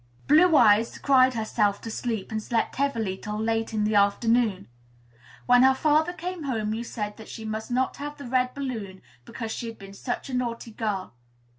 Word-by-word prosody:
Blue 320 +3 +5
Eyes 225 -2 +4
cried 260 -2 +4
herself 215 -2 0
to 225 - -6
sleep, 225 -3 -3
and 215 0 -2
slept 230 +1 -1
heavily 230 -9 -1
till 210 0 -5
late 225 +1 -1
in 215 -1 0
the 215 +1 +1
afternoon. 205 0 +2 0.8
When 245 0 +6
her 265 +1 +6
father 310 +4 +2
came 355 -2 -6
home, 220 -5 -1
you 225 +2 -3
said 210 -3 -5
that 220 - -12
she 225 - -8
must 220 +2 -4
not 255 +1 0
have 290 +1 -6
the 285 - -9
red 250 0 0
balloon, 225 -9 -5 0.2
because 225 -1 -6
she 235 - -4
had 225 -1 -8
been 195 -1 -11
such 245 +7 -4
a 265 - -7
naughty 235 -2 -3
girl. 210 - -3
230 Hz, 190 wpm, -26 LUFS, 215-260 Hz, 0.8 s, When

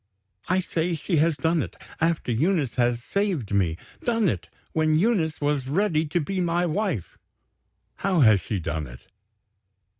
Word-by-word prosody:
"I 185 +1 +3
say, 170 -1 -1
she 165 +2 -1
has 160 +1 +3
done 160 0 +1
it, - - -6 0.2
after 165 -5 +1
Eunice 150 +2 +1
has 120 -1 +1
saved 180 - -1
me 90 -5 +1 0.3
done 230 -3 +2
it, 90 -5 -4 0.2
when 155 -1 +3
Eunice 170 -5 +1
was 145 -3 0
ready 160 0 +1
to 175 +4 0
be 185 +4 -2
my 175 0 +1
wife." 170 - -2 0.8
"How 185 -5 +1
has 110 -6 +6
she 100 +4 -3
done 80 -3 -3
it?" - - -12
160 Hz, 155 wpm, -25 LUFS, 120-180 Hz, 0.8 s, has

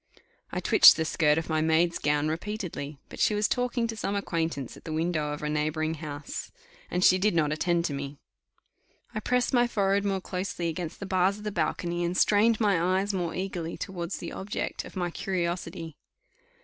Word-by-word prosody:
I - - -2
twitched - - +8
the 160 - 0
skirt 150 -1 +2
of 165 - -2
my 155 -1 +1
maid's 160 +2 +2
gown 145 +1 +1
repeatedly, 160 -4 -4
but - - -11
she 210 - +3
was 210 0 +2
talking 245 -1 0
to 225 -1 -4
some 205 -2 -2
acquaintance 165 - -2
at - - -15
the 160 - -6
window 155 -2 0
of 150 0 -5
a - - -1
neighbouring 155 +1 0
house, 150 -2 -6 0.4
and 180 +1 0
she 185 0 +6
did 205 -1 +2
not 150 -3 +2
attend 170 +2 +1
to 145 - -1
me. 140 +1 -5 1.0
I - - -2
pressed 250 +4 +1
my 245 -1 +4
forehead 200 -3 +1
more 195 -1 0
closely 180 -2 -3
against 165 +2 -5
the - - -3
bars 190 +1 +2
of 210 - -11
the 210 - -2
balcony, 175 -3 -1
and 175 +1 -1
strained 215 +2 +4
my 200 -6 +3 0.2
eyes 200 +1 -1
more 175 -3 -2
eagerly 180 -3 -4
towards 175 -3 -4
the 170 - -6
object 200 +2 -4
of - - -12
my 175 -2 -1
curiosity. 170 -3 -3
175 Hz, 195 wpm, -28 LUFS, 160-200 Hz, 1.0 s, twitched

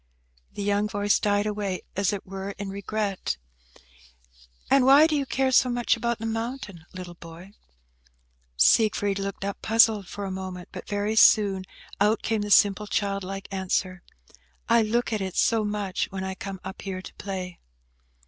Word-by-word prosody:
The 205 - -5
young 205 +1 +1
voice 205 0 +1
died 205 0 +1
away, 205 -3 -3
as 195 -1 +1
it 200 -2 -5
were, 195 +1 -6
in 200 -1 -5
regret. 200 - -3 1.3
"And 275 -1 +4
why 275 +4 +7
do 315 -1 +1
you 280 -2 -1
care 265 0 +1
so 255 0 +4
much 240 0 +1
about 235 0 -1
the 225 - -6
mountain, 225 -6 -5
little 180 -1 -8
boy?" 170 +3 -12 1.1
Siegfried 205 - +3
looked 195 0 -4
up, 200 - -4
puzzled, 220 -3 +4
for 205 - -6
a 190 - -4
moment, 185 -1 -6
but - - -9
very 205 +1 -1
soon 200 -4 +5 0.3
out 210 +2 +2
came 220 -1 0
the 205 - -4
simple, 205 +1 +4
child 200 -2 -1
like 195 +1 -6
answer, 185 -1 -2 0.7
"I 235 0 +5
look 230 +2 0
at 215 - -1
it 190 -1 -4
so 225 -2 +3
much 205 -2 -2
when 190 -1 -5
I 190 0 -3
come 190 0 -7
up 190 0 -8
here 185 -2 -5
to - - -10
play." 185 -3 -5
205 Hz, 170 wpm, -26 LUFS, 190-220 Hz, 1.3 s, why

